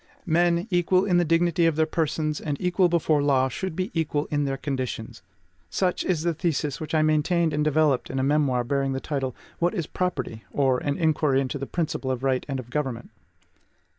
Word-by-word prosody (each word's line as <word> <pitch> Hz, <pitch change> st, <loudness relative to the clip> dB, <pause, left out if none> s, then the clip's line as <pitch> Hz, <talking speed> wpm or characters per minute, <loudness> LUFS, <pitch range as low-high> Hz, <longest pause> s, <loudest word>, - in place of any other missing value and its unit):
MEN, 175 Hz, +2 st, +2 dB
EQUAL 180 Hz, +2 st, +3 dB
IN 180 Hz, -3 st, +3 dB
THE 175 Hz, -, +3 dB
DIGNITY 165 Hz, +1 st, +3 dB
OF 165 Hz, -, +1 dB
THEIR 160 Hz, 0 st, +3 dB
PERSONS 155 Hz, -1 st, -1 dB
AND 145 Hz, -2 st, -3 dB
EQUAL 180 Hz, 0 st, +2 dB
BEFORE 160 Hz, -3 st, +2 dB
THE 145 Hz, -, 0 dB
LAW, 130 Hz, -2 st, +3 dB
SHOULD 185 Hz, +6 st, -4 dB
BE 185 Hz, +6 st, -2 dB
EQUAL 150 Hz, -2 st, -1 dB
IN 145 Hz, -1 st, +1 dB
THEIR 135 Hz, -1 st, -2 dB
CONDITIONS, 130 Hz, -5 st, -4 dB, 0.5 s
such 180 Hz, -, 0 dB
is 170 Hz, -4 st, 0 dB
the 170 Hz, 0 st, +1 dB
thesis 150 Hz, -4 st, -2 dB
which 155 Hz, +1 st, -3 dB
I 155 Hz, -, +4 dB
maintained 155 Hz, +2 st, +2 dB
and 150 Hz, 0 st, +1 dB
developed 150 Hz, -3 st, +2 dB
in 135 Hz, -, -4 dB
a 130 Hz, -, +1 dB
memoir 140 Hz, -3 st, +2 dB
bearing 135 Hz, +2 st, 0 dB
the 130 Hz, -, -2 dB
title, 135 Hz, -4 st, -3 dB, 0.2 s
"What 175 Hz, +4 st, +1 dB
is 170 Hz, -5 st, -1 dB
Property? 135 Hz, -12 st, -3 dB
or, 135 Hz, -3 st, +2 dB
An 145 Hz, -1 st, -2 dB
Inquiry 155 Hz, -4 st, +2 dB
into 135 Hz, +1 st, -2 dB
the 135 Hz, -, -4 dB
Principle 155 Hz, -5 st, -2 dB
of 130 Hz, 0 st, -2 dB
Right 130 Hz, -1 st, +1 dB
and 135 Hz, -1 st, -2 dB
of 125 Hz, -1 st, -9 dB
Government." 130 Hz, -5 st, -3 dB
150 Hz, 205 wpm, -25 LUFS, 135-170 Hz, 0.5 s, I